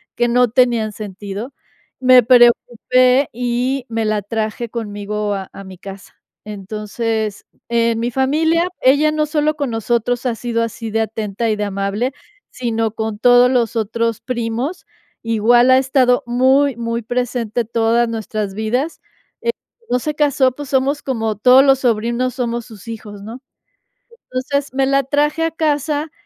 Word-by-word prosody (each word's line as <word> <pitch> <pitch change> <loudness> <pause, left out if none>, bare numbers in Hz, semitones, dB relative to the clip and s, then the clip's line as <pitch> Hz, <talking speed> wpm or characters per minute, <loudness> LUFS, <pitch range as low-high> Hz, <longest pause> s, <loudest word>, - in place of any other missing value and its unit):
que 240 0 +1
no 245 0 +3
tenían 235 -3 +2
sentido. 205 +4 -7 0.5
Me 255 -2 +6
preocupé 250 +2 +4
y 245 +2 -1
me 225 -1 -1
la 215 -2 0
traje 220 +2 -3
conmigo 210 -2 -4
a 190 -1 -6
a 195 - -9
mi 190 -1 -11
casa. 195 +1 -11 0.3
Entonces, 215 +1 -4 0.2
en 230 -1 +1
mi 235 +1 -1
familia, 320 +6 +1
ella 285 +4 +4
no 305 0 0
solo 300 0 0
con 285 -3 -2
nosotros 235 +2 -1
ha 245 - +1
sido 230 0 -2
así 230 0 -5
de 225 0 +1
atenta 220 0 -3
y - - +1
de 210 - -1
amable, 200 +6 -2 0.4
sino 225 -3 -2
con 220 -1 -4
todos 245 +1 +5
los 235 -2 +1
otros 230 +1 -1
primos. 240 +6 -3 0.4
Igual 230 +3 +3
ha 260 - +7
estado 260 -2 +2
muy, 260 +2 +3
muy 230 0 -3
presente 245 -1 -2
todas 230 +1 +1
nuestras 215 -3 -4
vidas. 245 +9 -2 0.8
Eh, - - -28
no 250 - +2
se 300 +3 -3
casó, 280 -4 +2
pues, 290 0 -8
somos 275 +2 0
como 225 -5 -2
todos 255 +4 +6
los 270 -1 +4
sobrinos, 240 +1 0
somos 235 -2 -3
sus 220 -1 -14
hijos, 210 -3 -8
¿no? 230 +4 -9 0.9
Entonces, 270 +2 -2
me 270 0 +1
la 275 0 +2
traje 295 +4 0
a 325 - 0
casa 300 -1 -1
240 Hz, 155 wpm, -18 LUFS, 220-260 Hz, 0.9 s, ha